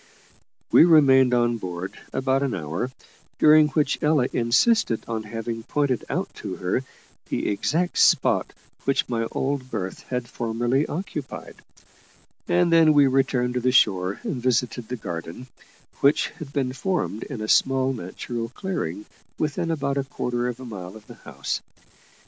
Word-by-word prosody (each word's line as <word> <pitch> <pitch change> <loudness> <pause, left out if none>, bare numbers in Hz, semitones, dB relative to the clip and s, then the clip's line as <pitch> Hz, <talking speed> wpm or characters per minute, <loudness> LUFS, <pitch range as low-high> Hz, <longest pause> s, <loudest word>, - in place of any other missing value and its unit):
We - - +8
remained 135 -6 +6
on 120 -1 +2
board 90 -2 -5 0.2
about 130 +1 0
an 140 -3 -1
hour, 85 +8 -3 0.5
during 155 0 +6
which 145 0 0
Ella 150 -5 +2
insisted 120 - +2
on 115 -1 -2
having 115 +1 -5
pointed 135 0 -1
out - - -2
to - - -5
her 90 +8 -1 0.5
the - - -1
exact 165 - 0
spot - - +3 0.3
which 135 - +1
my 115 -2 -1
old 135 -1 -2
berth 95 -5 -4
had 125 -2 -2
formerly 120 +5 -1
occupied; 150 -5 -6 0.9
and 175 -1 +3
then 160 -2 +6
we 145 -1 +7
returned 130 -2 +1
to 125 - 0
the 125 +1 +1
shore 95 -6 +3
and - - -3
visited 125 -1 0
the 125 - -4
garden, 85 +3 -6 0.5
which 140 +2 +3
had 160 -4 -10
been 135 -3 -1
formed 170 - -2
in 130 -6 -6
a 110 - -4
small 130 +3 +3
natural 115 +2 -5
clearing 125 - -4 0.3
within 160 +3 -1
about 140 -3 -1
a - - 0
quarter 125 -2 -2
of 125 0 -4
a 130 - -8
mile 95 -4 -8
of 110 -1 -13
the - - -12 0.2
house. - - -3
125 Hz, 155 wpm, -24 LUFS, 115-140 Hz, 0.9 s, We